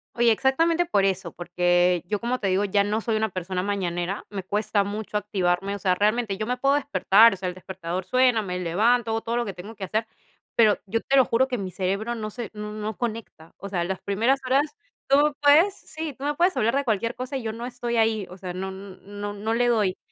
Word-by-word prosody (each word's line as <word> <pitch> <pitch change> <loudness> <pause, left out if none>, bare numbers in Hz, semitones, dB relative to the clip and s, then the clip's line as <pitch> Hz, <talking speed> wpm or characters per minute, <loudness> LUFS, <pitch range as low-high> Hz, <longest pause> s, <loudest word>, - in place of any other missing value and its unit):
Oye, 235 -1 +4
exactamente 325 +8 +2
por 200 - +2
eso, 190 -2 -1
porque 175 0 +1
yo, 205 +3 -2
como 240 +2 -1
te 200 - -1
digo, 190 +2 +2
ya 200 +1 +2
no 210 +2 0
soy 225 0 -1
una 220 0 0
persona 185 0 -3
mañanera, 185 -1 -2
me 195 -3 -5
cuesta 205 +1 0
mucho 210 +1 -6
activarme, 195 -2 0
o 200 - -5
sea, 185 -1 +2
realmente 215 +1 +1
yo 215 +2 -3
me 250 +2 -2
puedo 275 +2 +2
despertar, 230 -6 +5
o - - -6
sea, 185 0 -4
el 180 - -4
despertador 185 -1 -5
suena, 250 +1 +3
me 180 -3 -4
levanto, 225 +7 +2
hago 225 0 -1
todo 230 +1 -2
lo 240 - 0
que 200 - -5
tengo 185 +5 -9
que 200 -3 -6
hacer, 220 +4 -1 0.5
pero 215 -3 +5
yo 215 +3 -1
te 270 - 0
lo 265 - +7
juro 245 +3 +2
que 255 -2 -2
mi 190 -3 -5
cerebro 195 +6 -2
no 215 -2 -4
se, 230 -1 -6
no 210 0 -6
no 215 0 -5
conecta, 225 -8 -6
o 200 - -8
sea, 175 -3 -1
las 190 +1 -4
primeras 230 +7 +1
horas 280 - +1 0.3
tú 290 +2 +4
puedes, 315 +7 +5
sí, 315 -2 -7
tú 270 +2 -8
me 295 - +1
puedes 355 +4 +2
hablar 230 +4 +2
de 280 - +1
cualquier 230 -1 -1
cosa 255 +2 -4
y 260 - -6
yo 220 -1 -3
no 235 +2 -6
estoy 245 -1 -4
ahí, 220 -3 +1
o 180 - -11
sea, 185 -1 -6
no 190 +1 -4
no 200 +1 -8
no 210 +2 -2
le 245 +1 +2
doy. 210 -6 +1
215 Hz, 240 wpm, -25 LUFS, 190-240 Hz, 0.5 s, lo